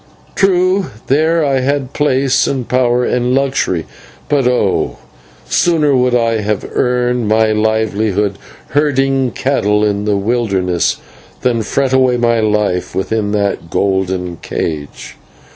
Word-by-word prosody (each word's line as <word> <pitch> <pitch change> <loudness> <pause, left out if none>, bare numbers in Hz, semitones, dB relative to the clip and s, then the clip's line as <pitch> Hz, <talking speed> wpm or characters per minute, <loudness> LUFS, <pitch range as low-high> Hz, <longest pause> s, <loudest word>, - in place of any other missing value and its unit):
True, 185 0 +2 0.2
there 160 +3 +2
I 135 -2 +1
had 135 0 -1
place 135 -2 +1
and 130 -4 -2
power 125 -1 +1
and 125 +1 0
luxury, 135 -11 0 0.4
but 140 -4 +2
oh! 125 0 0 0.5
sooner 155 -5 +2
would 125 -1 +2
I 115 -2 +1
have 105 -1 -2
earned 125 -2 0
my 110 +1 +3
livelihood 105 -2 0 0.3
herding 135 -2 +1
cattle 105 -6 0
in 105 0 -1
the 105 -1 +1
wilderness 100 -5 0 0.4
than 120 -2 +1
fret 130 +4 -1
away 130 -1 +3
my 115 -1 +2
life 105 -4 0
within 105 +2 -1
that 100 -5 -1
golden 95 -2 -1
cage. 75 -4 -5
120 Hz, 125 wpm, -15 LUFS, 105-135 Hz, 0.5 s, my